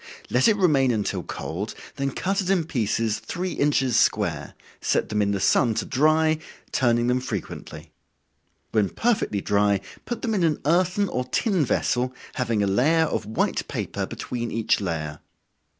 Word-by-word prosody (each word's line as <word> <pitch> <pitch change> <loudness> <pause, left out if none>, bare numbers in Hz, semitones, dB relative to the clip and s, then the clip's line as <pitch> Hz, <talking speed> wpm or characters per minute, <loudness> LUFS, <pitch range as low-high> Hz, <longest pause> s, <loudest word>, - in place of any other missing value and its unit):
Let 125 +1 +4
it 215 - +5
remain 150 -9 +3
until 110 -4 -1
cold, 95 +7 -5 0.2
then 140 0 0
cut 195 +8 -1
it 185 - -3
in 190 -4 +3
pieces 115 -6 -1
three 185 +1 -4
inches 135 -4 +1
square, 85 -9 0 0.3
set - - +1
them 105 0 0
in 100 - +2
the 100 -1 0
sun 115 +3 +3
to - - -1
dry, 155 +3 +3 0.3
turning 120 -2 +2
them 125 +1 +2
frequently. 115 -7 -6 0.8
When 105 -3 +2
perfectly 220 - 0
dry, 100 0 +2 0.3
put 240 - -4
them 225 -3 0
in 195 -4 +1
an 160 -3 +2
earthen 180 +5 +2
or 125 -7 -2
tin 180 - +1
vessel, 125 0 0 0.2
having 115 -5 0
a - - +2
layer 145 +12 +3
of 110 - -3
white 110 - -1
paper - - -3
between 120 -1 -4
each 110 -1 +1
layer. 80 -5 -3
125 Hz, 165 wpm, -24 LUFS, 105-160 Hz, 0.8 s, it